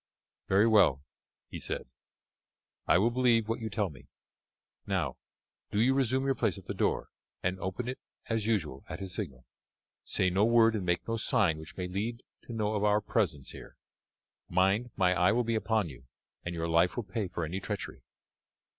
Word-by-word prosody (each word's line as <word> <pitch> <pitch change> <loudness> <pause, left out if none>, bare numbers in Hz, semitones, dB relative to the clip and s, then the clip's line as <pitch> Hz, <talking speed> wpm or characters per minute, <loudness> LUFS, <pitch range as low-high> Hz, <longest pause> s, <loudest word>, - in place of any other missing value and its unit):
"Very 100 +3 +5
well," 95 - +5 0.4
he - - -7
said, - - -4 1.0
"I - - +6
will 110 +6 +3
believe 120 -3 +3
what 115 - -1
you 110 -1 -4
tell 100 -4 -1
me. 70 - -15 0.8
Now, 90 -9 0 0.5
do 105 - -1
you 125 +4 +4
resume 130 0 +1
your 135 - +3
place - - 0
at - - -11
the - - -3
door, - - 0 0.3
and 95 +1 0
open 95 +7 -3
it 130 - -4 0.3
as 115 -2 -1
usual 80 -12 -1
at - - -5
his 95 -2 -4
signal. 70 - -5 0.6
Say 90 - +1
no 95 +3 +3
word 115 0 +5
and 95 -4 -3
make 85 0 0
no 115 0 0
sign 105 - +2
which 80 +4 -10
may 90 -1 -2
lead 110 +6 -3 0.2
him - - -27
to 120 - -6
know 110 -1 0
of 105 -1 0
our 105 0 +4
presence 85 - -1
here. - - -11 0.7
Mind, 95 +7 +2
my 90 -1 +3
eye 90 +2 +4
will 120 +2 +2
be 115 0 -1
upon 110 -3 +1
you, 65 -4 -11 0.4
and 85 0 -4
your 85 0 -2
life 85 +2 +3
will 120 - -2
pay 100 +1 -3
for 85 -1 -3
any 90 +5 -3
treachery." - - -5
100 Hz, 190 wpm, -30 LUFS, 90-115 Hz, 1.0 s, I